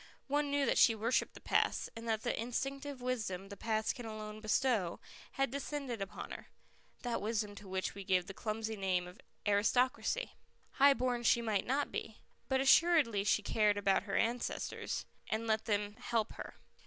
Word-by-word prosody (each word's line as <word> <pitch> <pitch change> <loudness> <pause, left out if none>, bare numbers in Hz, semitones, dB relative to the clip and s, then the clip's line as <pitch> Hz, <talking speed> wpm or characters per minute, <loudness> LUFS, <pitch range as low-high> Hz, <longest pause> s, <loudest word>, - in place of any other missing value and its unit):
One 290 +1 0
knew 285 0 +2
that - - +2
she 225 - +6
worshipped 230 +4 0
the - - -9
past, - - +1
and 230 0 -7
that 220 -1 0
the - - 0
instinctive 270 +3 -3
wisdom 210 -7 -2
the 200 - -7
past 220 +1 0
can 240 -2 -7
alone 215 0 -7
bestow 215 -5 +1 0.3
had 270 -2 0
descended 275 -4 -4
upon 195 +2 -6
her - - -8 0.6
that 245 -2 -1
wisdom 210 -1 -1
to 200 - -10
which 190 0 -2
we 200 - -7
give 185 -2 +2
the 195 - -8
clumsy 220 +2 -3
name 185 -3 0
of 180 +2 -13 0.3
aristocracy. 250 - +2 0.4
High 280 0 +6
born 245 0 0
she 235 0 +3
might 215 -4 0
not 275 +3 0
be. 220 - -5 0.3
But 265 0 +2
assuredly 275 - +5
she 210 +1 +2
cared 210 -1 +2
about 195 -1 +2
her - - -1
ancestors, 235 +1 -1 0.2
and 220 +1 -1
let 220 -1 +1
them 205 -1 -1
help 230 -2 -1
her. - - -8
225 Hz, 180 wpm, -34 LUFS, 205-255 Hz, 0.6 s, she